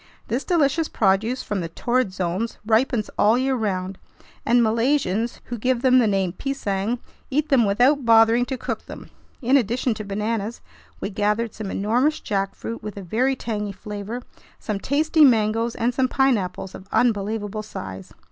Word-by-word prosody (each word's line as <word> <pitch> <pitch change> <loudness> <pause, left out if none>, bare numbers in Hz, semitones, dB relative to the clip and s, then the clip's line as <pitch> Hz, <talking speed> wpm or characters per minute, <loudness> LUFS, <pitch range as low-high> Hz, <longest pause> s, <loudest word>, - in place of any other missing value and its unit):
This 240 +5 -1
delicious 325 -2 +2
produce 215 +5 +1
from 205 -3 -2
the 165 - -4
Torrid 240 +4 0
Zones 185 +5 -2
ripens 225 0 +1
all 215 +3 +5
year 265 +1 +1
round, 190 -4 -2 0.5
and 240 +1 +5
Malaysians, 230 -1 0
who 240 -2 -6
give 250 +2 0
them 255 -1 +6
the 235 - +3
name 195 -3 0
"pisang," 220 -4 -2 0.3
eat 300 +3 0
them 260 -6 +4
without 250 +8 +3
bothering 230 +1 +5
to 265 0 -4
cook - - -5
them. - - -10 0.3
In 260 +4 +5
addition 245 +1 0
to 215 - -6
bananas, 210 +2 -3 0.4
we 200 - -3
gathered 210 +3 0
some 210 -2 -6
enormous 245 +11 +1
jackfruit 200 +2 -3
with 210 -2 -7
a 200 - -6
very 250 +9 +1
tangy 210 -4 -3
flavor, 210 +5 -6 0.3
some 210 -3 -4
tasty 305 - +3
mangoes, 230 -2 +3
and 240 +1 0
some 260 +1 +2
pineapples 205 -9 0
of 190 - -11
unbelievable 215 -2 0
size. 95 - -8
225 Hz, 160 wpm, -23 LUFS, 205-255 Hz, 0.5 s, them